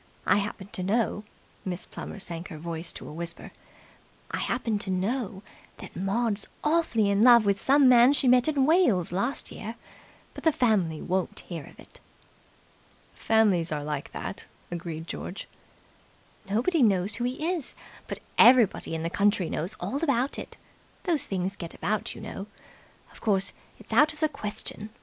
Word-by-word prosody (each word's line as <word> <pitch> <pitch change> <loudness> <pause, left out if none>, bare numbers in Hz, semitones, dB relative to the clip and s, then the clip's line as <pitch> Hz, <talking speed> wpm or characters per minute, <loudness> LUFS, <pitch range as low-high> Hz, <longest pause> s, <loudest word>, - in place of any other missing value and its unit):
I - - +4
happen 200 -1 -3
to 185 - -4
know" 210 +2 0 0.4
Miss 185 -1 -3
Plummer - - -8
sank 170 -2 -4
her 160 - -8
voice 165 +1 -4
to - - -9
a - - -8
whisper 170 +1 -6 0.8
"I - - -2
happen 230 -4 -1
to 200 - -5
know 195 +2 -2 0.3
that - - -11
Maud's 200 +3 -1 0.2
awfully 300 -10 +2
in 200 +2 +3
love 235 -3 +8
with 200 -1 +1
some 275 0 +5
man 250 +2 +7
she 275 - +2
met 250 +1 +5
in 285 -4 +2
Wales 265 - +3
last 235 +10 -2
year, 225 +2 -6 0.6
but - - -10
the 320 - +5
family 200 - +1
won't 185 0 -1
hear 165 -5 -7
of - - -16
it." - - -16 1.1
"Families 205 -7 +2
are 150 -1 -2
like 150 -1 -4
that," - - -6 0.2
agreed 165 -2 -5
George. 180 +2 -6 1.0
"Nobody 255 - +2
knows 195 -3 +3
who 240 - -3
he 275 +8 -1
is, 320 -7 -4 0.3
but - - -6 0.2
everybody 235 -8 +6
in 160 - -3
the 165 - -1
county 200 -3 +2
knows 170 +5 -2
all 260 - -3
about 275 -3 +1
it. - - -9 0.5
Those 335 -6 0
things 190 0 -2
get 170 -4 -8
about, 215 +2 -2
you - - -9
know. 210 -2 -7 0.6
Of - - -16
course, 195 -3 +2 0.2
it's - - -10
out 310 +1 +5
of 305 - -14
the 310 0 +2
question. 210 -3 -6
205 Hz, 170 wpm, -27 LUFS, 180-250 Hz, 1.1 s, love